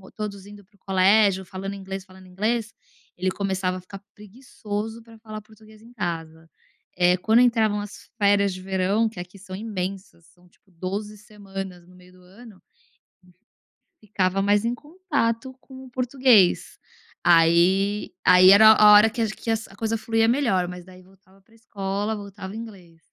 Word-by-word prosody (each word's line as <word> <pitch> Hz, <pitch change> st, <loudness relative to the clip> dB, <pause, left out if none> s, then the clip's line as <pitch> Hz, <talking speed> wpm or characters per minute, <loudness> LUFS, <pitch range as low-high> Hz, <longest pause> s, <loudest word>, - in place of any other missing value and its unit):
todos 200 Hz, -2 st, -6 dB
indo 205 Hz, 0 st, -13 dB
para 200 Hz, +2 st, -32 dB
o -, -, -30 dB
colégio, 195 Hz, +1 st, +3 dB
falando 190 Hz, +2 st, -7 dB
inglês, 195 Hz, -1 st, -7 dB
falando 185 Hz, -1 st, -17 dB
inglês, 215 Hz, +4 st, -2 dB, 0.5 s
ele 185 Hz, +1 st, -1 dB
começava 190 Hz, -2 st, -2 dB
a -, -, -9 dB
ficar 195 Hz, +2 st, -11 dB
preguiçoso 215 Hz, 0 st, -7 dB
pra 225 Hz, 0 st, -17 dB
falar 215 Hz, -1 st, -9 dB
português 215 Hz, 0 st, -19 dB
em 230 Hz, +2 st, -17 dB
casa. 165 Hz, -5 st, -6 dB, 0.5 s
É 180 Hz, 0 st, +4 dB
quando 220 Hz, +5 st, +2 dB
entravam 225 Hz, -4 st, +2 dB
as 205 Hz, 0 st, -10 dB
férias 200 Hz, -1 st, +2 dB
de 185 Hz, -, -9 dB
verão, 190 Hz, +4 st, 0 dB
que 220 Hz, -2 st, -10 dB
aqui 180 Hz, +2 st, -10 dB
são 190 Hz, -1 st, -9 dB
imensas, 190 Hz, -4 st, -6 dB
são 180 Hz, +2 st, -25 dB
tipo 190 Hz, -, -33 dB
12 200 Hz, +5 st, -6 dB
semanas 195 Hz, -4 st, -9 dB
no 180 Hz, -, -19 dB
meio 180 Hz, 0 st, -19 dB
do 185 Hz, -, -20 dB
ano 200 Hz, +2 st, -16 dB, 1.4 s
ficava 195 Hz, -2 st, -1 dB
mais 205 Hz, +2 st, +2 dB
em 235 Hz, -, 0 dB
contato 275 Hz, -5 st, -3 dB
com 265 Hz, -1 st, -13 dB
o -, -, -13 dB
português. 250 Hz, -6 st, +2 dB, 0.4 s
Aí 175 Hz, +5 st, +3 dB
aí 180 Hz, +1 st, +7 dB
era 215 Hz, +3 st, +8 dB
a 210 Hz, -1 st, +7 dB
hora 210 Hz, +2 st, +7 dB
que 235 Hz, +1 st, -4 dB
ach 225 Hz, -, 0 dB
que 230 Hz, -, -4 dB
a -, -, +2 dB
que 220 Hz, -3 st, -9 dB
coisa 225 Hz, +1 st, -2 dB
fluía 225 Hz, +1 st, 0 dB
melhor 230 Hz, -8 st, +1 dB
mas 180 Hz, 0 st, -9 dB
daí 185 Hz, 0 st, -16 dB
voltava 190 Hz, +1 st, -24 dB
pra 220 Hz, +4 st, -29 dB
escola, 205 Hz, -1 st, -4 dB
voltava 200 Hz, -2 st, -9 dB
o -, -, -9 dB
inglês. 195 Hz, -8 st, -11 dB
200 Hz, 170 wpm, -23 LUFS, 185-220 Hz, 1.4 s, era